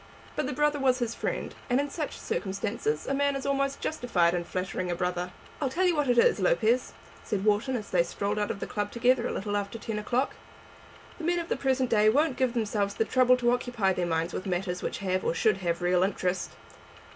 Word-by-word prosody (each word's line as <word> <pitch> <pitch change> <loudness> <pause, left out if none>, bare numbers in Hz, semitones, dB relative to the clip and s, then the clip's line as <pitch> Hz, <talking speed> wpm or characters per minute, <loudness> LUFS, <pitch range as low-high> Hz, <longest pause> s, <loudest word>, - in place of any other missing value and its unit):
But - - -1
the - - -2
brother 295 +1 +1
was 260 -2 +3
his 240 -2 -2
friend, - - -3 0.2
and 245 +2 +3
in 285 0 -2
such 305 -2 -4
circumstances 195 -5 -2
a - - -1
man 280 0 +1
is 270 - -4
almost 275 0 0
justified 180 - +1
in 175 -1 -1
flattering 185 +1 -3
a 175 - 0
brother. 180 0 -2 0.3
"I'll 275 - +1
tell 355 +8 +1
you 355 -2 +3
what 295 -3 +1
it 245 - +3
is, 235 - +5
Lopez," 220 +7 +2 0.3
said 205 -1 -2
Wharton, 220 +5 +2
as 215 -4 -5
they 180 - +4
strolled 200 +4 -2
out 210 - 0
of - - -3
the - - -3
club 205 -1 -3
together, 245 0 +2
a - - -3
little 205 +1 -3
after 205 +2 -2
ten 220 -1 -4
o'clock, 245 +6 0 0.9
"the - - -7
men 350 +2 +1
of 340 -1 -3
the - - +1
present 260 -2 0
day 215 -1 +5
won't 290 +4 +2
give 255 -2 +1
themselves 205 -3 0
the 225 - +1
trouble 255 +1 +4
to 240 -1 +2
occupy 240 -6 +1
their 180 -1 -1
minds 165 +1 -1
with 185 - -4
matters 180 0 -2
which - - -3
have, 185 0 0
or - - 0
should 210 +3 +3
have, 175 -2 -2
real 180 0 +3
interest. 185 -1 0
215 Hz, 225 wpm, -28 LUFS, 185-260 Hz, 0.9 s, is